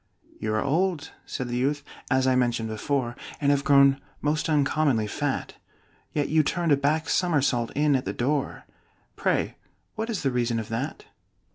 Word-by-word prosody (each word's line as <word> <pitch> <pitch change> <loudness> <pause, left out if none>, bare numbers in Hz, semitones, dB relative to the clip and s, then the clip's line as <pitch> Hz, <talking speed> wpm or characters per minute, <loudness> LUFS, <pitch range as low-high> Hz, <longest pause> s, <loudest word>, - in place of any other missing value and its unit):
"You 110 0 -1
are 110 - +1
old," 170 +2 0 0.2
said 130 -3 -4
the 120 0 -2
youth, 140 +3 0 0.3
"as 130 -1 +2
I 130 -1 +3
mentioned 120 -3 +1
before, 120 +2 -1 0.2
And 145 -1 +3
have 140 -1 +2
grown 140 -1 +5 0.2
most 150 +2 0
uncommonly 145 -5 +2
fat; 105 - -2 0.6
Yet 145 -2 0
you 155 0 +4
turned 170 +2 0
a - - +7
back 150 +3 0
somersault 140 -9 +1
in 145 -1 +3
at 130 - -1
the - - -1
door 140 +3 -1 0.5
Pray - - 0 0.4
what 220 +1 -4
is 215 -8 -2
the 135 - +2
reason 120 -1 0
of 110 0 -4
that?" 125 +7 -4
140 Hz, 170 wpm, -26 LUFS, 125-150 Hz, 0.6 s, a